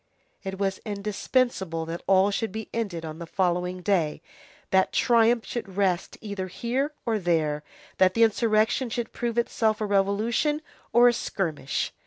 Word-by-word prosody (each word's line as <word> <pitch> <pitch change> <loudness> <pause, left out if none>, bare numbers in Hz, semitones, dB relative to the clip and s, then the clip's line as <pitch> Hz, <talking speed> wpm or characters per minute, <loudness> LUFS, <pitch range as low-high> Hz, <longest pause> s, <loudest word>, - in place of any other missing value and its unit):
It 190 -1 -5
was 195 -1 -1
indispensable 200 -4 -1
that 165 +1 -5
all 195 +1 +4
should 220 +1 -2
be 220 +1 -6
ended 195 -8 -3
on 155 +1 -7
the 170 - -7
following 180 0 -1
day, 170 -7 0 0.5
that 190 0 +3
triumph 235 -1 +3
should 200 -6 -6
rest 190 -3 0
either 200 -3 -4
here 245 - -2
or 225 -3 +1
there, 160 -5 +1 0.4
that 185 0 +4
the 230 - +5
insurrection 225 +2 +2
should 230 0 -4
prove 240 -1 -3
itself 220 -2 +1
a 215 - -1
revolution 215 +10 +1 0.3
or 240 +1 +6
a 240 - +5
skirmish. 165 - -2
200 Hz, 155 wpm, -26 LUFS, 185-230 Hz, 0.5 s, or